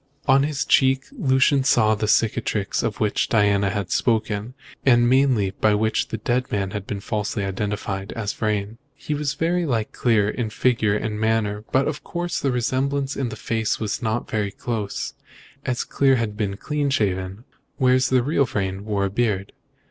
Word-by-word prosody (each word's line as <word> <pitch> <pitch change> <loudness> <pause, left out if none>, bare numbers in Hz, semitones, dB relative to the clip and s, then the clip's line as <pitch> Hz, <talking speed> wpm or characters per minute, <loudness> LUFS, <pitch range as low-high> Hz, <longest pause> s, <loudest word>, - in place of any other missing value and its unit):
On 135 +1 +5
his 145 -1 -1
cheek 135 0 +3
Lucian 135 - +2
saw 110 -5 +4
the 105 0 -1
cicatrice 105 -2 +1
of 105 - -3
which 105 -2 0
Diana 100 -2 +3
had 95 -2 -3
spoken, 110 0 0 0.3
and 120 -2 +5
mainly 125 -6 +3
by 105 +2 +2
which 110 +1 0
the 110 - -4
dead 125 +4 -1
man 100 -2 -1
had 100 0 -5
been 100 - -3
falsely 105 0 -2
identified 100 0 -3
as 105 -3 -3
Vrain. 105 +1 -2 0.2
He 150 - -4
was 145 -1 -2
very 175 +2 0
like 115 -8 -1
Clear 110 -4 +2
in 110 +1 -2
figure 110 -2 +1
and 105 0 -3
manner; 110 -1 0
but, 135 +1 +2
of 150 -1 -4
course, 175 0 -3
the 135 - 0
resemblance 135 +3 -1
in 135 -3 -2
the 110 - -6
face 110 -1 -1
was 110 +1 -2
not 115 0 -1
very 105 -2 -1
close, 105 0 -4 0.5
as 125 -1 0
Clear 135 -1 +2
had 115 -4 -2
been 100 -2 -2
clean 150 +2 -1
shaven, 95 -4 -1 0.3
whereas 130 0 +3
the 130 -2 +3
real 140 +1 +2
Vrain 95 -3 -3
wore 100 -2 0
a - - -1
beard. 100 -3 -1
110 Hz, 180 wpm, -23 LUFS, 105-130 Hz, 0.5 s, On